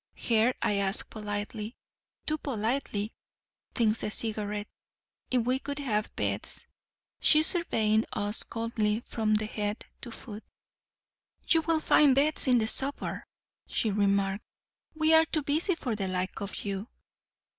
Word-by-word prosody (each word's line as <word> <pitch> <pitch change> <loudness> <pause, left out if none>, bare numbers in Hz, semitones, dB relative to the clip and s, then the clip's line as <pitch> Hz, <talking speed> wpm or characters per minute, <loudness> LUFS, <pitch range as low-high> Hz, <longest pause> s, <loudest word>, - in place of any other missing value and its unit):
Her 230 +2 +3
I 205 - +2
asked 195 +1 +1
politely—too 215 +7 -6
politely, 225 -4 -2 0.6
thinks 225 -2 +2
the - - -1
Cigarette—if 210 +3 -4
we 255 +2 +1
could 280 +1 -5
have 220 -7 -2
beds: - - -1 0.5
she 310 0 +7
surveying 220 - +2
us 205 +1 -2
coldly 225 -1 -1
from 220 -3 0
head 210 0 -2 0.2
to 250 - -6
foot. 220 -2 -9 1.0
'You 325 - +4
will 320 0 +1
find 285 -4 +5
beds 290 +1 +3
in 250 -1 +5
the 220 - +2
suburb,' 270 +4 0 0.4
she 220 - 0
remarked. 200 0 +1 0.5
'We 315 0 +3
are 320 0 +7
too 310 -2 -1
busy 315 +6 +1
for 250 -8 -3
the 195 -2 -2
like 185 +2 -3
of 200 +1 -5
you. 200 +2 -3
220 Hz, 130 wpm, -29 LUFS, 210-275 Hz, 1.0 s, she